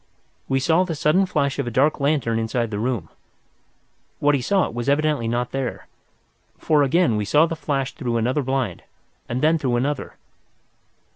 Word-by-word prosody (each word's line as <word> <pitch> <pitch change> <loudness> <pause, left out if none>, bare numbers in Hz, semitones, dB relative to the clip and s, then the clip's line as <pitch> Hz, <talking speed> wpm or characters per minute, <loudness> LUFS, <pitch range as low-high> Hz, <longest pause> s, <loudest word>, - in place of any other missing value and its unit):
We 135 - +2
saw 160 +6 +3
the 175 -3 -4
sudden 165 +6 +2
flash 140 -5 -1
of 135 - -1
a - - 0
dark 135 +7 +2
lantern 140 -6 +1
inside 115 0 -2
the 105 - -3
room. 115 -8 -2 1.1
What 145 0 +2
he 140 - +1
sought 190 - +1
was 120 +3 -2
evidently 145 -4 +1
not 120 +1 -1
there, 135 -3 -4 0.7
for 150 -2 +2
again 140 -4 +2
we 105 - -1
saw 150 +9 +4
the 165 - -3
flash 135 -4 -2
through 120 -5 -2
another 125 +6 0
blind, 130 -8 -2 0.5
and 125 +3 -2
then 160 +1 +3
through 130 -4 0
another. 135 +4 -2
135 Hz, 170 wpm, -22 LUFS, 120-150 Hz, 1.1 s, saw